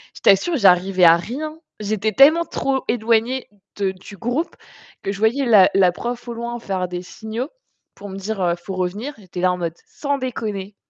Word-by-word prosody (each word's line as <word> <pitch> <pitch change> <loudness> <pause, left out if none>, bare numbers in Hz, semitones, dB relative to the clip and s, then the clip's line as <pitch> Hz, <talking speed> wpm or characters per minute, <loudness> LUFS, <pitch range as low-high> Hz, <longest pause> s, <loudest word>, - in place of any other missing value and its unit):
je - - -12
t'assure, 200 - +4
j'arrivais 185 -2 +4
à 165 0 +8
rien. 305 - -6 0.2
J'étais 215 +1 -1
tellement 310 +8 +6
trop 270 -1 -1
éloignée 230 +2 +1 0.3
de 195 -2 0
du 190 +2 -12
groupe 245 +9 -2 0.5
que 195 - -2
je 200 - -6
voyais 235 +6 +2
la 205 -6 +6
la 190 -2 +5
prof 240 +5 -5
au 235 - -4
loin 235 +1 -5
faire 190 -4 -2
des 180 0 -5
signaux 220 - -6 0.5
pour 205 - -10
me 190 - -7
dire, 200 +1 -4
heu: 175 -1 +2
«Faut 190 - -5
revenir». 200 +10 -3
J'étais 180 -3 -8
là 185 0 +3
en 180 - -2
mode: 170 -2 -3
«Sans 285 -1 -2
déconner». 210 -6 -4
215 Hz, 195 wpm, -21 LUFS, 190-245 Hz, 0.5 s, à